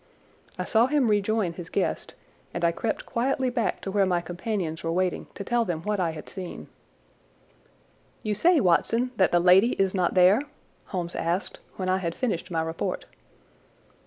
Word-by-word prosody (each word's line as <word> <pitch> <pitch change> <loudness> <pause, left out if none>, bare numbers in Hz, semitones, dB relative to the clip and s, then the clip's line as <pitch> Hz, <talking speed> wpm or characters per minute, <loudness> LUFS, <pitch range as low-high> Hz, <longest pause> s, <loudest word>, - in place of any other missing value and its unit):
I - - -3
saw 230 +1 +3
him 275 -4 +2
rejoin 205 -3 +1
his 170 -1 -9
guest, - - -2 0.4
and 175 0 0
I 170 - +4
crept 220 +7 -3
quietly 260 +1 0
back 240 -3 -1
to 195 - -4
where 195 -1 +2
my 180 -2 +2
companions 175 -1 -4
were 165 - -1
waiting 180 +1 -1
to - - -5
tell 240 +3 +1
them 170 -6 -3
what 210 0 -1
I 175 -2 +1
had 160 -1 -8
seen. 185 -3 -8 1.5
"You 215 -2 0
say, 335 - +4
Watson, 230 +5 +2
that 190 - +4
the 175 - +4
lady 185 +7 +5
is 195 -1 +1
not 180 -2 0
there?" 185 +6 +6 0.4
Holmes 175 -2 -4
asked 175 +4 -2 0.2
when 185 - -3
I 185 0 +2
had 170 -3 -3
finished 225 -10 -2
my 165 -2 0
report. 160 0 -3
190 Hz, 175 wpm, -26 LUFS, 175-225 Hz, 1.5 s, there